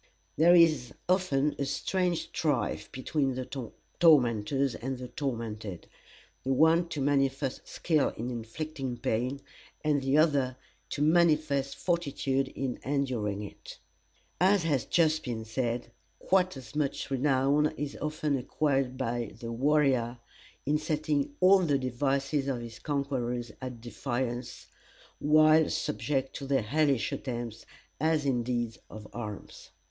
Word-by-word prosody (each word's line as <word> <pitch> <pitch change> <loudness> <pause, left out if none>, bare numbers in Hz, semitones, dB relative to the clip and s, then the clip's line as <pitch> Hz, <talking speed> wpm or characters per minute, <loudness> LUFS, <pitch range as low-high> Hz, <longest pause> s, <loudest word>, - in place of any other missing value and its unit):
There 170 +3 +6
is 155 -8 +4
often 150 -6 +2
a 140 - 0
strange 175 +5 -1
strife 140 -9 -1
between 135 0 -1
the 130 0 -3 0.5
tormentors 135 -4 +4
and 130 +1 -4
the 125 0 -7
tormented; 115 - -4 0.6
the 135 - -1
one 160 +4 +4
to 150 - -4
manifest 135 -1 0
skill 155 -4 +1
in 120 +3 -3
inflicting 130 +2 -5
pain, 125 +6 -1 0.4
and 150 -2 +2
the 135 +2 +2
other 140 -5 +3 0.3
to 145 - -1
manifest 155 -4 +3
fortitude 140 -6 0
in 130 -2 -4
enduring 125 -7 -1
it. 100 - -10 0.6
As 190 +1 +4
has 145 -7 +1
just 155 -2 +2
been 115 -3 -4
said, 120 +1 -2 0.3
quite 185 -4 +1
as 130 0 -11
much 145 -2 -2
renown 135 +2 +3
is 145 -1 -4
often 150 -1 -1
acquired 135 -1 0
by 120 -4 -2
the 115 -1 -5
warrior, 130 -2 +2 0.5
in 150 +2 +2
setting 150 -2 -1
all 190 +1 +7
the 155 -6 +2
devices 135 +2 0
of 130 -3 -1
his 115 -1 -9
conquerors 125 -5 -2
at 125 -3 -6
defiance, 120 0 -4 0.5
while 155 +1 +5
subject 140 -2 -2
to 140 - -6
their 135 -4 +2
hellish 140 +1 +1
attempts, 120 -3 -5 0.3
as 155 0 +1
in 130 -3 +1
deeds 120 -1 -2
of 105 0 -9
arms. 105 -4 -7
135 Hz, 130 wpm, -29 LUFS, 120-150 Hz, 0.6 s, all